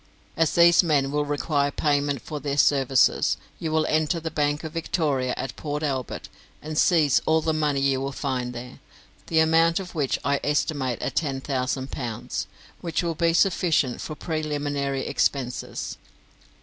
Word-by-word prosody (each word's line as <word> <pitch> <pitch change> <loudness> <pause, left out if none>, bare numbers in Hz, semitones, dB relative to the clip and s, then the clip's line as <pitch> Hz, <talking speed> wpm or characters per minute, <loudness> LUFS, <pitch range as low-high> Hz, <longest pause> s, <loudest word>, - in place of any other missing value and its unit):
As 165 -1 +1
these 170 0 +7
men 145 -6 +1
will 150 0 0
require 145 0 0
payment 145 -3 0
for 150 - -5
their 140 0 -3
services, 135 -2 +3 0.2
you 160 - -3
will 155 0 +2
enter 155 +2 +1
the 160 0 -5
Bank 145 0 0
of 160 - -5
Victoria 145 -6 -1
at 130 - -4
Port 150 0 -4
Albert, 135 -4 -3 0.3
and 155 0 -6
seize 150 -4 +4
all 160 0 +4
the 160 0 0
money 150 -3 0
you 135 -1 +1
will 135 0 -2
find 130 -3 -3
there, 125 +2 -9 0.5
the 160 - -1
amount 165 +2 +4
of 185 -2 -8
which 145 -5 0
I 140 0 +2
estimate 145 -4 0
at - - -3
ten 140 -4 0
thousand 130 0 -2
pounds, 120 -1 -4 0.3
which 170 -1 -2
will 170 -1 -1
be 165 +1 +1
sufficient 170 -8 +2
for 155 - -5
preliminary 145 -4 -2
expenses. 130 -3 -2
145 Hz, 160 wpm, -25 LUFS, 135-160 Hz, 0.5 s, these